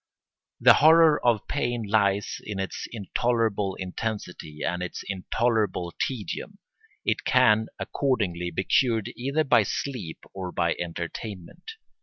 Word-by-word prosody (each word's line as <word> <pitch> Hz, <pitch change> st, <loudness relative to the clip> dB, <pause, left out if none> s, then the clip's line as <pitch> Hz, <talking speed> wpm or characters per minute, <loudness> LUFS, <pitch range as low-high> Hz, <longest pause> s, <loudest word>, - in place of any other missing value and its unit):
The -, -, +8 dB
horror 160 Hz, 0 st, +6 dB
of 120 Hz, -4 st, +2 dB
pain 120 Hz, -1 st, -1 dB
lies 100 Hz, -1 st, +1 dB
in 105 Hz, -2 st, -5 dB
its 95 Hz, -, -4 dB
intolerable 110 Hz, -2 st, 0 dB
intensity 90 Hz, -5 st, -5 dB
and 90 Hz, +1 st, -1 dB
its 90 Hz, -, -5 dB
intolerable 100 Hz, -2 st, -1 dB
tedium. 130 Hz, -, -4 dB, 0.5 s
It -, -, 0 dB
can 110 Hz, -4 st, +4 dB
accordingly 100 Hz, -11 st, -1 dB
be 90 Hz, +3 st, -2 dB
cured 115 Hz, 0 st, +2 dB
either 140 Hz, +5 st, 0 dB
by 130 Hz, -5 st, +5 dB
sleep 105 Hz, -4 st, -4 dB, 0.2 s
or 95 Hz, -2 st, -5 dB
by 85 Hz, -1 st, +1 dB
entertainment. 85 Hz, -, -6 dB
105 Hz, 120 wpm, -26 LUFS, 90-120 Hz, 0.5 s, The